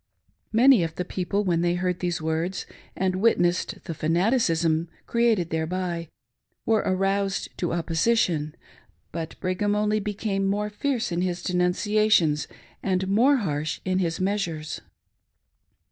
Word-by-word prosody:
Many 240 Hz, 0 st, +6 dB
of 165 Hz, -1 st, -4 dB
the 180 Hz, -, -3 dB
people, 190 Hz, +3 st, -1 dB
when 175 Hz, -4 st, +1 dB
they 175 Hz, 0 st, +1 dB
heard 180 Hz, 0 st, -1 dB
these 175 Hz, -1 st, -1 dB
words 160 Hz, +4 st, -2 dB, 0.3 s
and 185 Hz, -1 st, 0 dB
witnessed 185 Hz, -4 st, +1 dB
the 165 Hz, -, -5 dB
fanaticism 165 Hz, -, +1 dB, 0.2 s
created 225 Hz, -8 st, +1 dB
thereby, 170 Hz, +1 st, -2 dB, 0.6 s
were 225 Hz, -1 st, +3 dB
aroused 195 Hz, +1 st, 0 dB
to 175 Hz, -, -1 dB
opposition, 165 Hz, -2 st, +1 dB, 0.6 s
but 165 Hz, -1 st, -6 dB
Brigham 205 Hz, +3 st, 0 dB
only 210 Hz, +1 st, +1 dB
became 200 Hz, -1 st, -2 dB
more 210 Hz, +1 st, -1 dB
fierce 245 Hz, -1 st, -1 dB
in 170 Hz, +1 st, 0 dB
his 180 Hz, -1 st, -2 dB
denunciations 180 Hz, -3 st, +2 dB, 0.3 s
and 190 Hz, -1 st, 0 dB
more 245 Hz, +8 st, +4 dB
harsh 155 Hz, -, -2 dB
in 185 Hz, 0 st, +1 dB
his 165 Hz, -3 st, -1 dB
measures. 185 Hz, -6 st, -2 dB
185 Hz, 130 wpm, -25 LUFS, 170-205 Hz, 0.6 s, Many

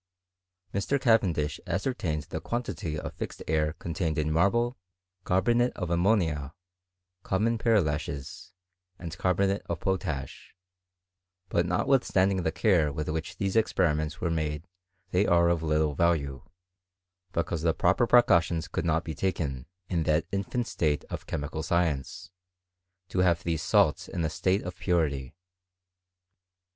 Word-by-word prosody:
Mr. 100 Hz, +8 st, 0 dB
Cavendish 90 Hz, -, +2 dB
ascertained 95 Hz, -, -1 dB
the -, -, -6 dB
quantity 100 Hz, -10 st, -3 dB
of -, -, -5 dB
fixed -, -, -6 dB
air 75 Hz, -1 st, +1 dB
contained 85 Hz, -1 st, -3 dB
in 75 Hz, 0 st, 0 dB
marble, 120 Hz, +9 st, +2 dB, 0.5 s
carbonate 120 Hz, +7 st, +2 dB
of 90 Hz, -3 st, -4 dB
ammonia, 85 Hz, -6 st, +1 dB, 0.7 s
com 95 Hz, +2 st, -1 dB
mon 115 Hz, 0 st, +1 dB
pearlashes, 80 Hz, -, -1 dB, 0.5 s
and 85 Hz, -4 st, -7 dB
carbonate 95 Hz, +2 st, +1 dB
of 85 Hz, -2 st, -3 dB
potash: 85 Hz, -8 st, -3 dB, 0.9 s
but 85 Hz, 0 st, +1 dB
not 90 Hz, +6 st, 0 dB
withstanding 100 Hz, -8 st, +3 dB
the 80 Hz, -, 0 dB
care 85 Hz, -3 st, +2 dB
with 75 Hz, +1 st, -4 dB
which 80 Hz, +1 st, -4 dB
these 95 Hz, 0 st, -1 dB
experiments 80 Hz, -8 st, +1 dB
were 85 Hz, -, -1 dB
made 80 Hz, +1 st, -2 dB, 0.4 s
they 95 Hz, +3 st, +2 dB
are 85 Hz, 0 st, +4 dB
of 85 Hz, -2 st, +1 dB
little 75 Hz, -1 st, +1 dB
value; 70 Hz, -4 st, +1 dB, 0.9 s
because 85 Hz, -2 st, -2 dB
the 80 Hz, 0 st, +3 dB
proper 90 Hz, +8 st, +2 dB
precautions 85 Hz, -9 st, +4 dB
could -, -, -3 dB
not 80 Hz, 0 st, +1 dB
be 80 Hz, -, -5 dB
taken, 75 Hz, -7 st, -2 dB, 0.2 s
in 85 Hz, -2 st, 0 dB
that 80 Hz, 0 st, +1 dB
infant 100 Hz, +5 st, -1 dB
state 75 Hz, -8 st, -1 dB
of -, -, -6 dB
chemical 75 Hz, +2 st, -3 dB
science, 80 Hz, -5 st, -1 dB, 0.8 s
to 90 Hz, -, -2 dB
have 90 Hz, -2 st, +3 dB
these 80 Hz, -2 st, -1 dB
salts 80 Hz, -, +2 dB
in 85 Hz, -, -3 dB
a 80 Hz, -, -1 dB
state 95 Hz, +5 st, +1 dB
of 90 Hz, 0 st, -6 dB
purity. 80 Hz, -7 st, 0 dB
85 Hz, 135 wpm, -28 LUFS, 75-95 Hz, 0.9 s, are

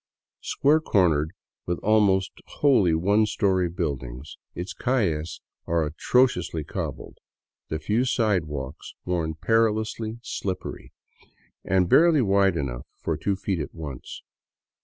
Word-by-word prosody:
Square 150 Hz, +3 st, +2 dB
cornered, 85 Hz, -, +2 dB, 0.4 s
with 90 Hz, 0 st, 0 dB
almost 100 Hz, -3 st, +3 dB, 0.2 s
wholly 105 Hz, -, +3 dB
one 100 Hz, +6 st, +3 dB
story 95 Hz, -3 st, +1 dB
buildings, 70 Hz, -6 st, -4 dB, 0.2 s
its 90 Hz, +2 st, -5 dB
calles 90 Hz, -, -1 dB, 0.3 s
are 85 Hz, -1 st, +1 dB
atrociously 85 Hz, -, +1 dB
cobbled, -, -, -6 dB, 0.5 s
the 80 Hz, -, -1 dB
few 105 Hz, +10 st, 0 dB
sidewalks 85 Hz, -, -1 dB
worn 85 Hz, -3 st, -1 dB
perilously 110 Hz, +2 st, 0 dB
slippery 95 Hz, -7 st, -5 dB, 0.7 s
and 95 Hz, -1 st, +2 dB
barely 160 Hz, -, +5 dB
wide 100 Hz, -3 st, +3 dB
enough -, -, -4 dB
for -, -, -2 dB
two 100 Hz, -, -1 dB
feet 95 Hz, -2 st, -2 dB
at 75 Hz, -, -5 dB
once. 75 Hz, -6 st, -8 dB
95 Hz, 115 wpm, -25 LUFS, 80-110 Hz, 0.7 s, barely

